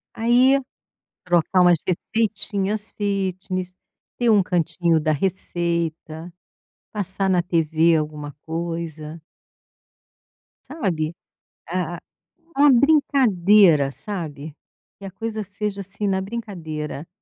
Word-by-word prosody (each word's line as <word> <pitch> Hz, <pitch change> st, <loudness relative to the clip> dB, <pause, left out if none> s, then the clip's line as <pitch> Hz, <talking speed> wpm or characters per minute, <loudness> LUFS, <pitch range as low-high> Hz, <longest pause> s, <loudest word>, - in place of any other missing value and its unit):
Aí 250 Hz, +4 st, +4 dB, 0.6 s
trocar 175 Hz, +1 st, +2 dB
umas 175 Hz, -1 st, +5 dB
receitinhas 210 Hz, +1 st, -1 dB
fitness, 185 Hz, -2 st, -3 dB, 0.4 s
ter 240 Hz, -1 st, +2 dB
um 210 Hz, -2 st, +6 dB
cantinho 170 Hz, -1 st, +1 dB
da 155 Hz, +1 st, 0 dB
receita, 170 Hz, -1 st, -2 dB, 0.6 s
passar 195 Hz, -1 st, -1 dB
na 180 Hz, -2 st, +3 dB
TV 165 Hz, -1 st, +2 dB
alguma 150 Hz, -1 st, -3 dB
coisa 165 Hz, -1 st, -5 dB, 1.5 s
sabe. 170 Hz, -, -2 dB, 0.5 s
A 175 Hz, -1 st, -2 dB, 0.6 s
a 275 Hz, -, +1 dB
uma 290 Hz, -1 st, +7 dB
brincadeira, 210 Hz, -, +4 dB
sabe, 155 Hz, -5 st, -7 dB, 0.4 s
que 200 Hz, -, -9 dB
a 195 Hz, -, -7 dB
coisa 220 Hz, +2 st, -4 dB
seja, 200 Hz, 0 st, -4 dB
assim, 200 Hz, +2 st, -4 dB
na 190 Hz, -1 st, +1 dB
brincadeira. 170 Hz, -8 st, -6 dB
180 Hz, 100 wpm, -22 LUFS, 165-205 Hz, 1.5 s, uma